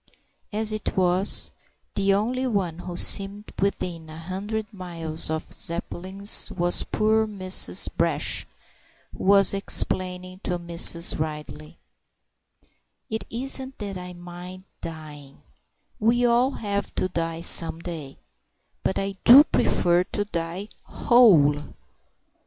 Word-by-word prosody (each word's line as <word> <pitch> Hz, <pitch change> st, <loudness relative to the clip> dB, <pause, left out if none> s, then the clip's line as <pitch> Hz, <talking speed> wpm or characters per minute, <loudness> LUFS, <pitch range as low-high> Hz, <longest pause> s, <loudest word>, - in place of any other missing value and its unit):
As 215 Hz, 0 st, -2 dB
it 215 Hz, -, -5 dB
was, 185 Hz, +1 st, +4 dB, 0.4 s
the 195 Hz, 0 st, 0 dB
only 245 Hz, +6 st, -1 dB
one 185 Hz, -8 st, -3 dB
who 180 Hz, -1 st, -7 dB
seemed 200 Hz, +3 st, +5 dB
within 175 Hz, -4 st, -3 dB
a 155 Hz, -, -11 dB
hundred 205 Hz, +6 st, -6 dB
miles 165 Hz, -5 st, -6 dB
of 160 Hz, 0 st, -4 dB
Zeppelins 185 Hz, +4 st, -1 dB
was 175 Hz, 0 st, 0 dB
poor 220 Hz, +1 st, 0 dB
Mrs. 185 Hz, -, +3 dB
Brash, -, -, -1 dB, 0.7 s
who -, -, -7 dB
was 195 Hz, 0 st, +4 dB
explaining 185 Hz, -2 st, 0 dB
to 180 Hz, -2 st, -3 dB
Mrs. 170 Hz, -1 st, +3 dB
Ridley— 150 Hz, -, -7 dB, 1.3 s
"It 220 Hz, -, -4 dB
isn't 265 Hz, +2 st, -1 dB
that 200 Hz, -3 st, -6 dB
I 180 Hz, 0 st, -9 dB
mind 175 Hz, +1 st, -11 dB, 0.2 s
dying: 150 Hz, -4 st, -11 dB, 0.6 s
we 240 Hz, +3 st, +1 dB
all 240 Hz, +2 st, +2 dB
have 205 Hz, -6 st, -5 dB
to -, -, -1 dB
die 165 Hz, -2 st, -4 dB
some 165 Hz, -1 st, +3 dB
day: 160 Hz, -6 st, -8 dB, 0.6 s
but -, -, -2 dB
I 195 Hz, 0 st, -3 dB
do 265 Hz, +5 st, +9 dB
prefer 175 Hz, -, +1 dB
to 205 Hz, -, -4 dB
die 175 Hz, +2 st, -6 dB
whole." 150 Hz, -, +2 dB
185 Hz, 120 wpm, -23 LUFS, 170-205 Hz, 1.3 s, do